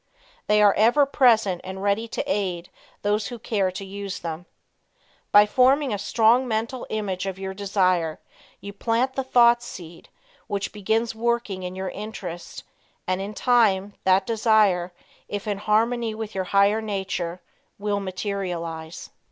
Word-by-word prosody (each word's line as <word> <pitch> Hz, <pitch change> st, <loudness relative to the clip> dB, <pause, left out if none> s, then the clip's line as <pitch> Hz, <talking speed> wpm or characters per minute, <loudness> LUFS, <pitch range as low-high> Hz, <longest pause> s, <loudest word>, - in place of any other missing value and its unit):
They 210 Hz, 0 st, +4 dB
are 205 Hz, -1 st, +6 dB
ever 240 Hz, +7 st, +4 dB
present 225 Hz, -9 st, +3 dB
and 190 Hz, +1 st, -7 dB
ready 205 Hz, +3 st, +1 dB
to 230 Hz, -, -3 dB
aid 185 Hz, -10 st, -2 dB, 0.3 s
those 205 Hz, 0 st, 0 dB
who 240 Hz, -, -7 dB
care 205 Hz, -4 st, 0 dB
to 195 Hz, -, -6 dB
use 195 Hz, -1 st, -6 dB
them. 165 Hz, +1 st, -6 dB, 0.8 s
By 205 Hz, 0 st, +8 dB
forming 260 Hz, +3 st, +3 dB
a 205 Hz, -, -2 dB
strong 230 Hz, +5 st, +3 dB
mental 230 Hz, +3 st, -3 dB
image 195 Hz, -3 st, -3 dB
of 190 Hz, -1 st, -4 dB
your 190 Hz, 0 st, -5 dB
desire, 185 Hz, -5 st, 0 dB, 0.4 s
you 200 Hz, -, -8 dB
plant 235 Hz, +5 st, 0 dB
the 270 Hz, -, -2 dB
thought 240 Hz, -2 st, +5 dB
seed 175 Hz, -8 st, -10 dB, 0.4 s
which 200 Hz, -1 st, -3 dB
begins 220 Hz, +3 st, 0 dB
working 230 Hz, -4 st, -1 dB
in 180 Hz, 0 st, -5 dB
your 190 Hz, 0 st, -4 dB
interest 190 Hz, -5 st, -7 dB, 0.4 s
and, 185 Hz, +1 st, -1 dB
in 205 Hz, +2 st, -6 dB
time, 205 Hz, -5 st, +2 dB
that 190 Hz, 0 st, +3 dB
desire, 215 Hz, -5 st, +2 dB, 0.4 s
if 205 Hz, -1 st, -5 dB
in 205 Hz, -2 st, -2 dB
harmony 225 Hz, +2 st, +1 dB
with 220 Hz, -1 st, -6 dB
your 190 Hz, -1 st, -2 dB
higher 200 Hz, +3 st, +3 dB
nature, 190 Hz, -4 st, -3 dB, 0.4 s
will 205 Hz, 0 st, -1 dB
materialize. 180 Hz, -4 st, -5 dB
205 Hz, 150 wpm, -24 LUFS, 190-225 Hz, 0.8 s, By